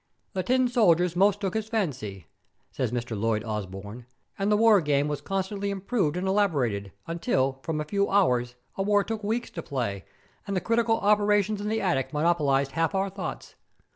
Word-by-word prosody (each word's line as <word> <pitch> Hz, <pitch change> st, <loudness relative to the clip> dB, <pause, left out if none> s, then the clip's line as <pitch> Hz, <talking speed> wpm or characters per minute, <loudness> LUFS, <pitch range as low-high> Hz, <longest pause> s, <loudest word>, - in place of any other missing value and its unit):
'The 190 Hz, -, -1 dB
tin 255 Hz, +5 st, +2 dB
soldiers 180 Hz, -8 st, +3 dB
most 200 Hz, +2 st, +3 dB
took 195 Hz, -3 st, -2 dB
his 220 Hz, 0 st, -3 dB
fancy,' 120 Hz, -, -3 dB, 0.5 s
says 125 Hz, -4 st, -2 dB
Mr. 120 Hz, -2 st, -3 dB
Lloyd 110 Hz, 0 st, 0 dB
Osbourne, 105 Hz, +2 st, -6 dB, 0.3 s
'and 200 Hz, +2 st, +1 dB
the 210 Hz, -, +4 dB
war 220 Hz, -3 st, +6 dB
game 145 Hz, -1 st, +1 dB
was 145 Hz, -1 st, -3 dB
constantly 195 Hz, +3 st, -2 dB
improved 195 Hz, -4 st, -1 dB
and 185 Hz, +1 st, -2 dB
elaborated, 135 Hz, -, +1 dB
until, 135 Hz, -, 0 dB
from 155 Hz, +2 st, -3 dB
a 150 Hz, -, -2 dB
few 200 Hz, +4 st, 0 dB
hours, 125 Hz, -11 st, +2 dB, 0.2 s
a -, -, 0 dB
war 205 Hz, 0 st, +3 dB
took 220 Hz, 0 st, -4 dB
weeks 225 Hz, +4 st, -2 dB
to 165 Hz, -, -5 dB
play, 115 Hz, -, -3 dB, 0.4 s
and 200 Hz, -1 st, -1 dB
the -, -, +3 dB
critical 230 Hz, +2 st, +1 dB
operations 205 Hz, 0 st, +2 dB
in 210 Hz, -, -2 dB
the 220 Hz, 0 st, 0 dB
attic 165 Hz, -8 st, 0 dB
monopolized 150 Hz, -4 st, +2 dB
half 165 Hz, +5 st, 0 dB
our 195 Hz, 0 st, 0 dB
thoughts. 195 Hz, -1 st, -6 dB
180 Hz, 180 wpm, -27 LUFS, 135-205 Hz, 0.5 s, war